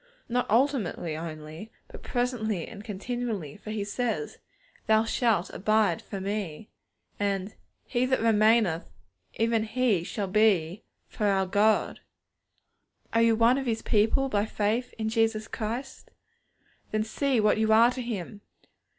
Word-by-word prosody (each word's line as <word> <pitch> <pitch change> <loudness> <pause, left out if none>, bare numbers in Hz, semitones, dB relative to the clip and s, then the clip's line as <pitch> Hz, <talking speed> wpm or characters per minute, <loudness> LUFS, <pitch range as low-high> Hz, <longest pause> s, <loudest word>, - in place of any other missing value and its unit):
_' - - -36 0.2
Not 245 +1 -1
ultimately 225 - +1
only, 155 +4 -8 0.2
but - - -12
presently 235 -7 -2
and 205 -2 -10
continually; 215 - -4
for 210 - -11
He 215 -1 -2
says, 245 - -3 0.5
'Thou 220 0 +4
shalt 225 -5 +1
abide 210 -3 +1
for 195 - -7
Me;' 200 -2 -4 0.5
and, 200 0 -1 0.3
'He 250 0 0
that 260 0 +1
remaineth, 215 -5 +3 0.5
even 225 -1 +1
he 225 -5 +1
shall 205 +3 -3
be 190 -3 +2 0.3
for 210 - -2
our 195 -1 +2
God.' 210 +3 +2 1.1
Are 230 - +4
you 230 -1 +4
one 230 +4 +4
of 265 - -4
His 225 -1 -1
people 225 +5 +2
by 210 -4 0
faith 220 +4 -1
in 220 -1 -2
Jesus 225 -1 +1
Christ? 235 +4 -5 0.8
Then 215 0 0
see 260 +3 0
what 215 0 +3
you 220 0 +2
are 230 +2 +6
to 255 - -5
Him. 210 -3 -5
220 Hz, 140 wpm, -27 LUFS, 200-235 Hz, 1.1 s, are